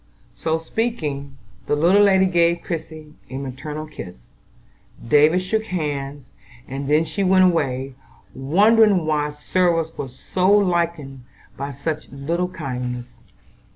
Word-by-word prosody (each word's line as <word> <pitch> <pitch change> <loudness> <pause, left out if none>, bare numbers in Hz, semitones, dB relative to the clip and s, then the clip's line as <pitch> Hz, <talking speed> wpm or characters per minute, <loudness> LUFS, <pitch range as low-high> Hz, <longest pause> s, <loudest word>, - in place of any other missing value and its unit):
So 160 0 -1
speaking, 155 - -3 0.3
the - - +2
little 175 +7 +4
lady 190 -2 +5
gave 170 -2 +2
Christie 155 -3 -6 0.2
a 130 - -5
maternal 140 +3 -6
kiss; 90 - -11 0.8
David 155 +7 +4
shook 220 +4 -1
hands; 145 - -4 0.4
and 135 +1 -5
then 150 +2 +4
she 160 +5 -3
went 185 0 +5
away, 135 -6 0 0.4
wondering 200 +6 +4
why 150 -1 0
service 165 +2 0
was 130 -2 -6
so 185 +7 0
lightened 170 -9 +1 0.3
by 140 +1 -5
such 150 +3 -4
little 165 +6 -2
kindnesses. 125 -7 -5
155 Hz, 120 wpm, -22 LUFS, 140-180 Hz, 0.8 s, lady